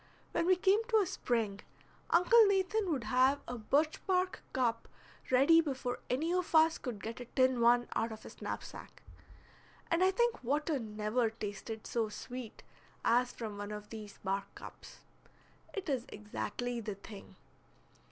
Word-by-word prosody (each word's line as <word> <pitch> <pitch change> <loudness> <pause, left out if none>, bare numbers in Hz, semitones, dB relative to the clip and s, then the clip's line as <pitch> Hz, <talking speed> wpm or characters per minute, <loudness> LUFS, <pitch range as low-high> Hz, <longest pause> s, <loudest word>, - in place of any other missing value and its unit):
When 335 - 0
we 370 - +6
came 390 +4 +3
to 450 -2 +3
a 415 - +4
spring, 225 - -1 0.5
Uncle 450 +7 +6
Nathan 395 +1 +1
would 270 -6 -1
have 255 +5 +3
a 245 - -4
birch 295 +8 +1
bark 370 -1 +1
cup 240 -3 0 0.4
ready 280 +6 +6
before 260 -5 -3
any 315 +7 0
of 365 -2 -1
us 320 +1 +5
could 225 -6 -6
get 225 +2 -5
a 245 - -6
tin 255 0 +2
one 240 +1 +5
out 225 +1 0
of 220 - -9
his - - -12
knapsack, - - -7 0.9
and 335 +2 +3
I 375 - +5
think 475 - +1
water 290 +3 0
never 215 +1 -1
tasted 220 0 -6
so 225 -2 -1
sweet 245 +2 -8 0.4
as 245 +1 +3
from 215 -3 -6
one 205 0 -5
of 210 0 -7
these 215 -2 -8
bark 195 0 -1
cups. - - -12 0.7
It 395 - -5
is 260 -5 -1
exactly 210 +3 -4
the 210 -3 -5
thing. 200 +1 -12
250 Hz, 160 wpm, -33 LUFS, 220-330 Hz, 0.9 s, we